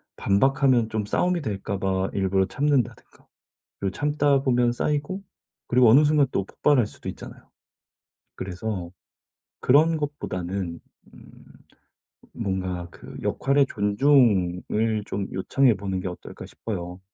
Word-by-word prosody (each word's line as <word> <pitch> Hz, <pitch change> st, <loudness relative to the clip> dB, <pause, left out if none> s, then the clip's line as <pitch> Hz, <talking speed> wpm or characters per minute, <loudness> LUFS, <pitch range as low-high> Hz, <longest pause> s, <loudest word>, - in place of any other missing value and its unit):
반박하면 130 Hz, +3 st, +2 dB
좀 110 Hz, -2 st, -2 dB
싸움이 180 Hz, -, 0 dB
될까 100 Hz, -5 st, -3 dB
봐 95 Hz, 0 st, 0 dB
일부러 95 Hz, 0 st, +1 dB
참는다든가 140 Hz, +4 st, -2 dB, 0.5 s
그리고 100 Hz, -1 st, -1 dB
참다 145 Hz, -2 st, +2 dB
보면 120 Hz, -2 st, +2 dB
쌓이고 150 Hz, +9 st, -2 dB, 0.4 s
그리고 125 Hz, -1 st, +5 dB
어느 135 Hz, +7 st, +7 dB
순간 150 Hz, -2 st, +3 dB
또 100 Hz, -, 0 dB
폭발할 130 Hz, +5 st, +2 dB
수도 -, -, -10 dB
있잖아요. -, -, -9 dB, 0.9 s
그래서 95 Hz, -1 st, -5 dB, 0.7 s
그런 155 Hz, +5 st, +4 dB
것보다는 95 Hz, -, -4 dB, 0.3 s
음 -, -, -16 dB, 1.0 s
뭔가 95 Hz, -2 st, -3 dB
그 -, -, -12 dB
역할의 140 Hz, +1 st, +2 dB
존중을 105 Hz, -2 st, +2 dB
좀 100 Hz, -1 st, -3 dB
요청해 125 Hz, +7 st, +2 dB
보는 95 Hz, -1 st, -3 dB
게 95 Hz, -, -4 dB
어떨까 90 Hz, -, -8 dB
싶어요. 90 Hz, -4 st, -6 dB
110 Hz, 275 characters per minute, -25 LUFS, 95-140 Hz, 1.0 s, 어느